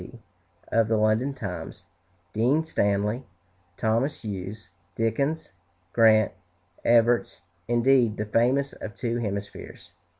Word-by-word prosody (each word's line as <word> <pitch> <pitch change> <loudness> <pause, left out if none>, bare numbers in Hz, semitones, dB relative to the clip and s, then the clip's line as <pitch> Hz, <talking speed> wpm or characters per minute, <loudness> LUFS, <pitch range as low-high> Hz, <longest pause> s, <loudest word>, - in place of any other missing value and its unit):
P., - - -11 0.5
of 115 -1 +2
the 110 0 +2
"London 110 +5 +2
Times," 95 -8 -6 0.5
Dean 130 +9 +2
Stanley, 105 -3 0 0.5
Thomas 115 +7 0
Hughes, 100 +1 -6 0.2
Dickens, 140 +8 -1 0.4
Grant, 110 -2 +5 0.5
Evarts; 120 0 +3 0.3
indeed, 120 -1 +3
the 105 - -2
famous 125 +6 +1
of 105 -2 -8
two 120 -1 -2
hemispheres. 100 -4 -6
115 Hz, 105 wpm, -26 LUFS, 105-125 Hz, 0.5 s, Grant